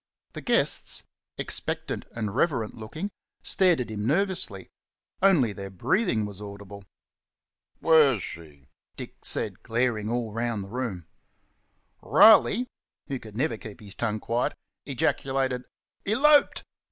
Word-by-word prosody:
The - - -7
guests, - - +2 0.3
expectant - - -2
and 110 -3 -3
reverent 130 -7 0
looking, 155 - -6 0.3
stared 180 -5 +3
at 120 - -5
him 105 0 -3
nervously 170 - 0 0.5
only 165 - +4
their 100 -1 -7
breathing 115 - 0
was 100 -1 -8
audible. 100 -1 -10 1.0
"Where's 145 - +5
she?" 75 -5 -10 0.3
Dick - - -10
said, - - 0
glaring 115 -2 -1
all 115 -2 -2
round 115 -2 -2
the 95 - -11
room. 115 -9 -4 1.0
Riley, 220 +2 +6 0.4
who 135 -2 -3
could 110 -2 -11
never 150 +5 0
keep 110 -4 -10
his 100 -2 -11
tongue 110 +1 -2
quiet, 115 +3 -1 0.3
ejaculated, 130 -1 -1 0.4
"Elorped!" 285 +8 +4
115 Hz, 120 wpm, -26 LUFS, 105-145 Hz, 1.0 s, Riley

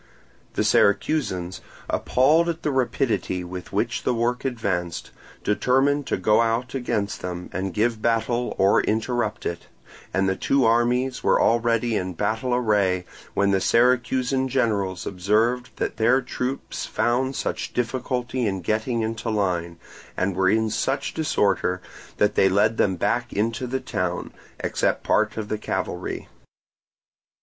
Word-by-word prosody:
The - - +1
Syracusans, 100 - +1 0.3
appalled 155 +7 +3
at 165 -1 -4
the 150 - +1
rapidity 125 -7 0
with 90 0 -8
which - - -1
the 125 - 0
work 120 +2 0
advanced, 95 -9 -2 0.3
determined 135 +6 +2
to - - 0
go 105 +4 +3
out 115 +2 0
against 105 -6 -2
them 90 0 -5
and 95 +1 -2
give 110 +3 0
battle 115 +1 0
and 95 +1 +4
interrupt 110 0 -1
it; 85 -1 -4 0.4
and 95 0 +1
the 95 - +1
two 135 +5 +2
armies 120 +3 +2
were - - +4
already 115 0 +2
in 95 -2 -2
battle 110 +7 -1
array, 100 -6 +1 0.3
when 100 0 +3
the 95 -1 +2
Syracusan 125 +3 +2
generals 105 -8 0
observed 110 +7 +1
that - - -3
their 120 +4 +4
troops 130 +1 -4
found 130 +3 0
such - - -3
difficulty 125 0 -1
in 95 -2 -2
getting 110 +5 -1
into 115 +1 -3
line, 90 -5 -1 0.4
and 95 0 0
were 95 0 +3
in 110 +1 +2
such 135 +6 -1
disorder, 100 - +1 0.4
that 105 0 +3
they 95 - +4
led 105 +4 +2
them 95 -2 +2
back 120 +7 -1
into 115 +4 -1
the 130 +2 -2
town, 90 -6 -3 0.3
except - - 0
part - - +1
of 110 -2 -3
the 105 0 -3
cavalry. - - -3
115 Hz, 140 wpm, -24 LUFS, 95-125 Hz, 0.4 s, and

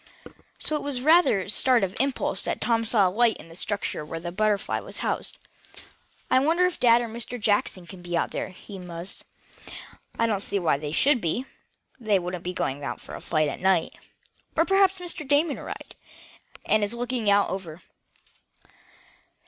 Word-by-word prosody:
So 310 - 0
it - - -5
was 285 -2 -1
with 250 - -5
rather 320 - +5
a 190 - -7
start 245 +1 +3
of 190 0 -2
surprise 270 0 +1
that - - -2
Tom 230 -1 +1
saw 215 -4 +5
a - - -1
light 230 +3 +3
in - - -13
the 165 - -12
structure 200 -4 -3
where 165 +2 -6
the 175 +1 -5
BUTTERFLY 210 +1 0
was - - -4
housed. - - -2 0.9
"I - - +6
wonder 330 +6 +3
if 360 - -2
dad 235 -1 +5
or 240 - -3
Mr. 235 +2 -6
Jackson 205 -4 0
can 180 +1 -11
be 175 -1 -2
out - - -1
there?" - - -3
he 195 +1 -11
mused. 175 +1 -8 0.4
"Yet, - - -8 0.4
I 230 - +2
don't 210 -4 0
see 205 - +3
why 170 -7 +2
they 145 0 -5
should 265 - +3
be. 175 +10 -1 0.5
They 215 -4 +2
wouldn't 180 -1 -4
be 180 - -3
going 140 -5 -2 0.2
for - - -11
a - - -7
flight 155 -2 +1
at 145 - -4
night. 185 -3 +2 0.6
Or 325 - +4
perhaps 390 0 +3
Mr. 345 -5 -4
Damon 290 +2 +2
arrived, - - -8 0.7
and 215 -1 +3
is 205 +3 0
out - - -8
looking 245 -2 -2
it 200 - +6
over." 185 -4 -2
210 Hz, 195 wpm, -25 LUFS, 180-255 Hz, 0.9 s, I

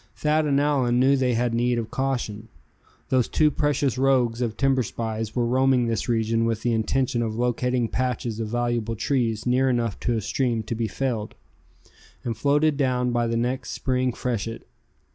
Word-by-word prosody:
Thad 155 0 +1
and 140 -1 +2
Allan 135 -4 +2
knew 135 +2 +4
they 130 -3 +1
had 120 0 0
need 120 +1 +1
of 115 -1 -4
caution. 120 -5 -2 0.6
Those 130 -2 +2
two 155 -1 +3
precious 145 -3 0
rogues 125 -3 +2
of 115 -3 -2
timber 135 -1 +2
spies 110 -2 -4
were 120 -2 +1
roaming 130 0 +3
this 115 +1 -2
region 115 0 +1
with 115 -1 -1
the 120 - +1
intention 120 +2 0
of 110 -2 -2
locating 125 0 0
patches 120 -2 -2
of 110 - -2
valuable 120 -1 -1
trees 115 -2 -1
near 130 +2 +2
enough 120 -4 -1
to 120 -2 0
a - - -1
stream 120 +1 -1
to 110 - -4
be 115 0 -1
felled, 110 0 -3 0.9
and 115 -2 -2
floated 145 +5 +2
down 125 -3 +1
by 120 -1 +1
the 115 0 -1
next 125 +2 -2
Spring 130 -1 0
freshet. 115 -2 -4
120 Hz, 180 wpm, -24 LUFS, 115-130 Hz, 0.9 s, knew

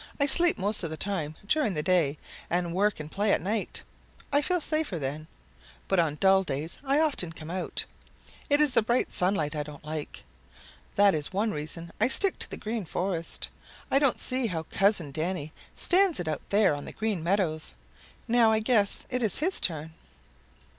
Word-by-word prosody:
"I 285 - +4
sleep 340 +5 +4
most 205 +2 +1
of 165 - -3
the 160 - -5
time 160 -5 -1
during 225 - +1
the 150 - -2
day, 165 -5 +2 0.3
and 175 -1 0
work 205 +1 +1
and 155 0 -7
play 205 +1 +1
at - - +2
night. 210 +3 -2 0.5
I 285 - +5
feel 360 +4 +1
safer 310 - 0
then. 150 +2 -5 0.6
But 195 - +2
on 160 -3 +1
dull 190 +3 +4
days 155 -1 -4
I 275 +1 +2
often 285 - +1
come 160 0 -9
out. 185 0 -2 0.6
It 290 0 +4
is 300 -2 +5
the 230 - +4
bright 235 +3 0
sunlight 180 -5 0
I 150 - -1
don't 150 0 -10
like. 155 -1 -6 0.7
That 200 0 +5
is 150 -2 -3
one 210 +4 0
reason 165 +2 -6
I 225 - +5
stick 380 +9 +2
to - - -3
the - - -6
Green 220 0 -4
Forest. 170 0 -3 0.4
I 275 - +5
don't 275 -3 +3
see 255 -1 0
how 165 -5 -3
Cousin 195 -7 +2
Danny 160 0 -3 0.2
stands 370 -1 +3
it 175 - -4
out 155 - -2
there 200 -5 +4
on 145 0 -6
the - - -8
Green 215 -5 -2
Meadows. 170 - 0 0.5
Now 230 -1 +4
I 220 - +3
guess 220 -3 +3
it 250 0 -1
is 215 -5 0
his 360 +6 +1
turn." 160 -1 -1
190 Hz, 190 wpm, -27 LUFS, 160-230 Hz, 0.7 s, I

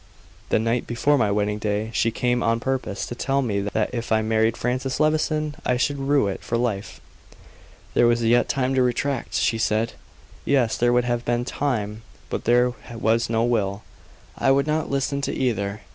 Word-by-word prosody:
The - - +3
night 115 +2 0
before 130 +5 +2
my 115 -7 +2
wedding 105 +1 0
day, 105 +1 -2
she 115 - +2
came 120 +1 0
on 115 0 +1
purpose 130 -5 -2
to - - -6
tell 135 +3 0
me 105 -5 -1
that 105 +2 -1
if 115 -2 -4
I 110 0 +3
married 110 +1 +1
Francis 130 +2 -2
Levison 155 0 +1
I 125 - +1
should 140 +2 0
rue 140 -2 +2
it 95 - -4
for 115 - -1
life. 115 -5 -2 0.9
There 120 - +4
was 120 0 +2
yet 120 +2 +3
time 130 -1 0
to 130 - +3
retract 125 +1 -1
she 115 -1 +1
said. 110 +1 0 0.5
Yes; 130 -5 +2
there 120 0 +2
would 125 0 +2
have 120 -1 -1
been 120 0 0
time; 110 -7 -2 0.3
but - - -3
there 125 +1 +3 0.2
was 115 0 +1
no 115 0 +1
will. 110 -3 0 0.5
I - - +1
would 140 +1 +4
not 155 0 -1
listen 140 +1 -1
to - - -2
either. 105 -5 -1
120 Hz, 190 wpm, -23 LUFS, 110-130 Hz, 0.9 s, There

